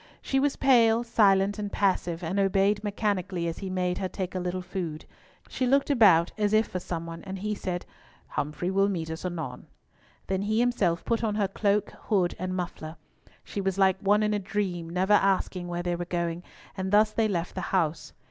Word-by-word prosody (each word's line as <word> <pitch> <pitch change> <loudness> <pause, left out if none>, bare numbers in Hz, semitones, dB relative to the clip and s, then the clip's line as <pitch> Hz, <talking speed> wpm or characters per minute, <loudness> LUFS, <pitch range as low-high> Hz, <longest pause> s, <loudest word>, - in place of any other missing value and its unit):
She 270 - 0
was 280 0 +1
pale, 235 -4 +4
silent, 205 -3 +3
and 205 -1 -4
passive, 180 -3 0
and 180 +5 -1
obeyed 195 +1 +2
mechanically 195 -4 -1
as 165 - -4
he 195 - -5
made 180 -1 -1
her 185 - -2
take 185 -1 -4
a 185 - -2
little 180 +1 -3
food. 175 -4 -5 0.4
She 255 - -1
looked 275 +3 +3
about 190 -10 +5
as 210 0 +1
if 215 0 +4
for 185 - -4
some 170 -2 -5
one, 165 0 -8
and 190 0 -6
he 210 +2 -2
said, 180 -3 -4 0.4
"Humfrey 150 +5 -2
will 195 +1 +3
meet 165 -4 -3
us 160 - -6
anon." 165 -7 -5 0.6
Then 190 0 -1
he 215 +2 0
himself 210 -9 +1
put 230 0 0
on 215 -2 0
her 205 -2 +1
cloak, 205 +1 0
hood, 190 -5 +2
and 185 +1 -3
muffler. 170 -3 -5 0.5
She 200 - -4
was 195 -1 -1
like 190 -1 +3
one 205 +2 +3
in 210 0 +1
a 205 - 0
dream, 185 -4 -3
never 185 +4 +1
asking 190 -2 +2
where 175 0 -3
they 175 0 -1
were 175 0 -4
going, 170 -1 -2 0.3
and 190 -1 -3
thus 210 +1 +5
they 220 0 +1
left 175 -4 -2
the 185 - -4
house. 165 -4 0
190 Hz, 205 wpm, -27 LUFS, 175-210 Hz, 0.6 s, about